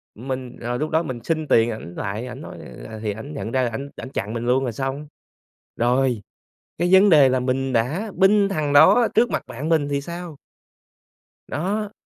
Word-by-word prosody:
mình 130 +1 -6
ờ, 120 +1 -2
lúc 155 +3 -2
đó 160 +1 +1
mình 130 -5 -5
xin 155 -2 -1
tiền 115 -2 +4
ảnh 90 -6 -8
lại 105 +5 -4
ảnh - - -8
nói, - - -9 0.3
à, 110 -1 -8
thì 105 - -1
ảnh 125 +9 -8
nhận 115 -5 -5
ra 130 -2 +1
ảnh 135 +5 -6
ảnh 135 - -8
chặn 105 -5 -4
mình 115 0 -3
luôn 130 +2 +2
rồi 125 - -1
xong. 135 +4 -4 0.7
Rồi, 125 -1 +1 0.6
cái 175 +2 +1
vấn 195 +2 +7
đề 145 -5 +7
là 130 - +1
mình 130 +1 -1
đã 155 - 0
binh 200 +1 +4
thằng 155 -6 -1
đó 195 +11 +7
trước 235 +2 +4
mặt - - -2
bạn 145 +7 -5
mình 155 -3 +2
thì 140 0 -1
sao? 170 -1 -7 1.1
Đó. 200 +7 -2
135 Hz, 200 wpm, -22 LUFS, 120-165 Hz, 1.1 s, vấn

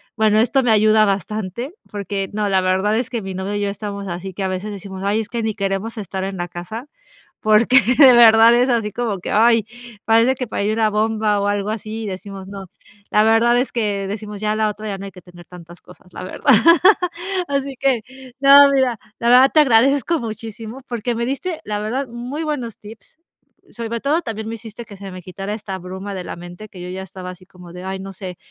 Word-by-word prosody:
bueno, 215 0 +3
esto 260 +4 +2
me 240 - +2
ayuda 215 0 +5
bastante, 205 - -3 0.2
porque 200 -1 -3
No, 210 -1 -1
la 190 -1 +3
verdad 190 +4 +1
es 245 0 -2
que 235 - -2
mi 190 -1 -6
novio 190 +2 -4
y 205 - -2
yo 200 - 0
estamos 200 0 -6
así 185 +2 -6
que 195 - -7
a 190 - 0
veces 185 +3 -4
decimos: 195 -1 -8
"Ay, 205 +2 +1
es 215 - -8
que 235 -1 -3
ni 220 -1 -1
queremos 200 +3 -3
estar 190 -1 -5
en 190 0 -4
la 175 0 -3
casa". 215 - -8 0.5
porque 220 +5 +5 0.2
de 265 -4 +9
verdad, 225 -1 +7
es 245 +2 +3
así, 230 -4 0
como 220 -3 -3
que: - - -5
"Ay, 230 0 +4 0.4
parece 230 +4 +4
que 250 -3 -5
parí 210 0 -1
una 220 -1 +1
bomba", 215 -1 +1
o 200 - -1
algo 205 0 -1
así, 220 +1 -5
y - - -4
decimos, 195 0 -8
no. 195 -1 -8 0.4
La 210 - +4
verdad 225 +2 +4
es 255 - 0
que 205 -4 -1
decimos: 210 0 -6
"Ya 210 0 0
a - - -2
la 215 0 +1
otra, 215 +1 -7
ya 195 -1 -4
no 195 - -8
hay 195 - -9
que 180 - -14
tener 175 -1 -15
tantas 175 -1 -13
cosas", 180 -1 -18
la - - -7
verdad 275 +8 +1 1.0
Así 275 -1 -2
que 270 -4 +2 0.4
No, 280 +1 +8
mira, 255 -5 +1 0.2
la 235 - 0
verdad, 255 +2 +7
te 310 - +7
agradezco 275 +4 +3
muchísimo. 225 +2 -7
Porque 240 0 -2
me 235 +1 -2
diste, 310 +6 -3
la 210 -1 -3
verdad, 250 +6 -3
muy 245 +6 -6
buenos 255 -8 -4
tips. 220 +8 -14 0.5
Sobre 235 0 -5
todo, 295 +6 +1
también 220 -4 -5
me 225 - -4
hiciste 225 +1 -10
que 205 - -12
se 195 0 -9
me 185 -1 -9
quitara 195 +3 -6
esta 200 -3 -6
bruma 190 +2 -7
de 185 -2 -5
la - - -6
mente, 175 +5 -10
que 185 - -13
yo 180 - -7
ya 190 +1 -5
estaba 185 -1 -8
así, 185 0 -13
como 180 -2 -14
de: 180 +1 -9
"Ay, 190 0 -4
no 195 0 -8
sé. 185 -1 -8
215 Hz, 225 wpm, -20 LUFS, 195-235 Hz, 1.0 s, de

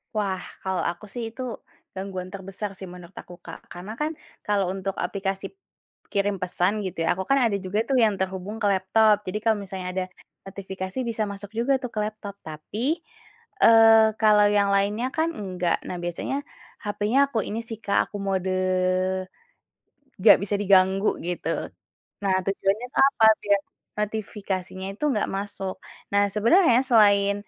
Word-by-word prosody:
Wah, 195 -3 -1 0.2
kalau 190 -1 0
aku 175 +5 -7
sih 240 - -4
itu 255 +3 -9 0.5
gangguan 190 -1 -5
terbesar 195 +2 -5
sih 190 - -8
menurut 180 0 -12
aku, 175 - -13
Kak. 165 - -8
Karena 180 +4 -8
kan 300 +6 -2 0.3
kalau 205 -2 +1
untuk 195 0 -4
aplikasi 195 - -3 0.6
kirim 200 0 +1
pesan 185 +3 0
gitu 185 - -5
ya, - - +3
aku 190 +1 -4
kan 275 - +4
ada 215 - +1
juga 205 +3 -1
tuh 270 - -2
yang 210 -3 +2
terhubung 190 +3 -4
ke - - +1
laptop 210 +3 +3
jadi 210 - -2
kalau 220 -2 +3
misalnya 190 -2 -6
ada 185 -1 -1 0.4
notifikasi 190 +1 -6
bisa 220 -1 -1
masuk 200 +1 -7
juga 255 +4 +2
tuh 250 -2 -7
ke 215 - -2
laptop, 210 -1 -5
tapi, 215 - -2 0.7
eee, 225 -1 +8
kalau 210 -1 +6
yang 200 -1 +3
lainnya 205 +5 +1
kan 325 +1 +2
enggak, 180 - -1
nah 180 - -4
biasanya 175 +10 -3 0.5
hapenya 210 +4 0
aku 230 - -1
ini 220 +2 -3
sih, 225 -1 -6
Kak, 200 - +2
aku 205 - -6
mode 190 -1 -1 1.7
nggak - - +9
bisa 205 +1 -1
diganggu 195 0 +3
gitu. 175 0 -3 0.8
Nah 190 -1 +2
tujuannya 195 +4 0
itu - - -4
apa, 225 -5 +4 0.2
biar 200 -1 +3 0.4
notifikasinya 195 -3 -4
itu 265 - -5
gak - - +1
masuk. 195 -1 -4 0.4
Nah 200 0 +3
sebenarnya 245 - +5
selain 200 -4 +5
200 Hz, 155 wpm, -25 LUFS, 190-220 Hz, 1.7 s, nggak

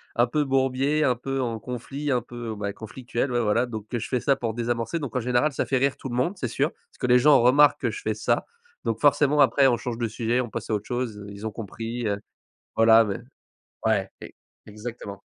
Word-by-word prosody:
un 120 - +4
peu 150 +5 0
bourbier, 135 +2 +1
un 125 -4 +3
peu 135 +3 -3
en 115 -3 -2
conflit, 125 +5 -5
un 125 -3 +2
peu 120 -2 -6
bah, 100 -1 -3
conflictuelle, 120 +5 -4
ouais, 120 0 +1
voilà. 115 +3 +2
Donc 110 -3 -7
que 120 - -2
je - - -6
fais 125 - +1
ça 140 +3 +2
pour 115 -4 -3
désamorcer. 120 +3 -1
Donc 140 -7 -5
en - - +2
général, 125 +5 +2
ça - - -1
fait 135 - +1
rire 135 +1 +1
tout 135 - -7
le 120 - -4
monde, 130 +9 +1
c'est 130 - -3
sûr. - - 0
Parce - - -29
que - - -1
les 125 0 +6
gens 145 +3 +6
remarquent 140 +4 +5
que - - -1
je 415 - -7
fais - - -1
ça. - - 0 0.4
Donc 115 -2 -1
forcément, 145 +1 +4
après 135 0 +5
on 120 -2 +3
change 120 -1 -5
de 120 - 0
sujet, 115 +2 0
on 120 - -5
passe 115 0 -5
à - - +2
autre 105 0 -2
chose, 120 -4 -3
heu, 100 - -9
ils 100 +1 -8
ont 110 - -2
compris, 115 +2 -5
heu, 100 -1 -1 0.6
voilà 115 0 +6
mais 100 -2 -3 0.7
ouais, - - +2
ex - - -10 0.3
exactement. 105 -2 -8
120 Hz, 240 wpm, -25 LUFS, 115-135 Hz, 0.7 s, les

